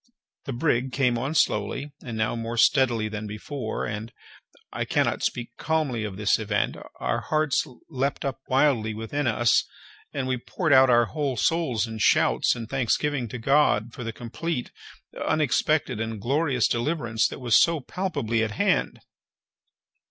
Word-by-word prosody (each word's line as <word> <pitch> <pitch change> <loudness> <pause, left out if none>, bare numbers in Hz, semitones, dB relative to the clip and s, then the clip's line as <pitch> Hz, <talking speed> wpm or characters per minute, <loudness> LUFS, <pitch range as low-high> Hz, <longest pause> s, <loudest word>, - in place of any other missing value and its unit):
The 140 - -4
brig 130 -1 0
came 125 -2 +2
on 135 +6 -3
slowly, 135 +5 0
and 115 -3 -5
now 110 +1 0
more 115 0 -4
steadily 120 -3 +3
than 105 0 -5
before, 110 +3 -4
and—I 110 +2 -8
cannot - - 0
speak 120 -1 -3
calmly 150 -8 -1
of 95 -3 -6
this 105 +1 +2
event—our 105 -1 -2
hearts 155 -2 +1 0.2
leaped 135 -1 -2
up 135 -1 -3
wildly 130 -5 +2
within 120 +6 -2
us, 120 0 +3 0.5
and 135 -2 -3
we 130 0 0
poured 155 +5 -1
out 130 -1 +7
our 120 -1 +5
whole 140 0 -2
souls 140 -10 +1
in 110 -1 -7
shouts 105 - +3
and 115 -2 -6
thanksgiving 135 +1 0
to 120 - -6
God 120 -3 +2
for 125 - -7
the 115 - -3
complete, 125 +5 -4 0.5
unexpected, 145 -3 +1
and 110 -1 -4
glorious 135 +2 +1
deliverance 120 -3 0
that - - -8
was 120 -4 +2
so 165 -2 +3
palpably 125 - -2
at 110 -1 -2
hand. - - 0
125 Hz, 150 wpm, -25 LUFS, 110-145 Hz, 0.5 s, out